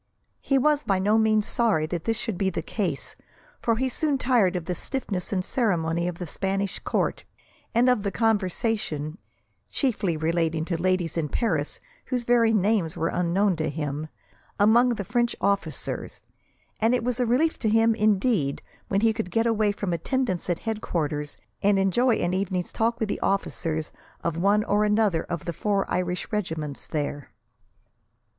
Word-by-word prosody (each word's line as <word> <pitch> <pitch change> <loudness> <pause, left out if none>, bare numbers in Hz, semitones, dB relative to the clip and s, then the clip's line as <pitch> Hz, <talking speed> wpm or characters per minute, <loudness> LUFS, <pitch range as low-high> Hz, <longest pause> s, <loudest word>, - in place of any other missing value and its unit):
He 275 - +1
was 295 +2 +3
by 195 -4 +1
no 210 +4 +3
means 215 -1 +3
sorry 225 -11 +1
that 165 +1 -4
this 225 -1 0
should 235 -3 -3
be 190 +1 +1
the 185 - -3
case, - - -3 0.5
for 230 - +2
he 260 +3 0
soon 285 +2 0
tired 240 -8 +2
of 175 -2 -3
the 180 - -2
stiffness 200 - -4
and 185 -2 0
ceremony 170 -7 0
of 175 -1 -4
the 180 - -5
Spanish 195 +4 -2
Court, - - -1 0.5
and 240 +2 +4
of 250 -4 +3
the 200 - -1
conversation 200 - -1 0.5
(chiefly 205 - 0
relating 160 0 0
to 170 -1 -2
ladies 185 -3 0
in 155 -3 -1
Paris, 160 - -1 0.3
whose 250 -2 -1
very 235 -1 +4
names 205 -5 +1
were 165 - 0
unknown 180 +2 +1
to 155 0 -1
him) 150 0 -3 0.5
among 235 +4 +5
the 200 - -4
French 240 +3 0
officers, 200 0 -1 0.6
and 225 +3 +3
it 245 - -1
was 250 0 -1
a 250 - +2
relief 295 +8 +2
to 220 - +1
him, 225 +1 +4
indeed, 210 - +1 0.2
when 195 0 +1
he 225 0 +4
could 220 -4 -3
get 225 +5 +1
away 215 -2 +2
from 200 -3 -3
attendance 185 - -1
at 175 - +1
headquarters, 155 -10 -3 0.2
and 200 0 +4
enjoy 225 +6 +3
an 175 -2 -1
evening's 185 -2 -1
talk 230 +1 0
with 220 - 0
the - - -2
officers 165 -5 -1 0.3
of 170 -2 -1
one 200 +5 +3
or 210 0 +2 0.2
other 195 -7 +2
of 170 -2 -5
the 170 - -3
four 200 +4 0
Irish 180 0 -2
regiments 160 -9 -3
there. 145 -2 -3
200 Hz, 170 wpm, -26 LUFS, 170-225 Hz, 0.6 s, among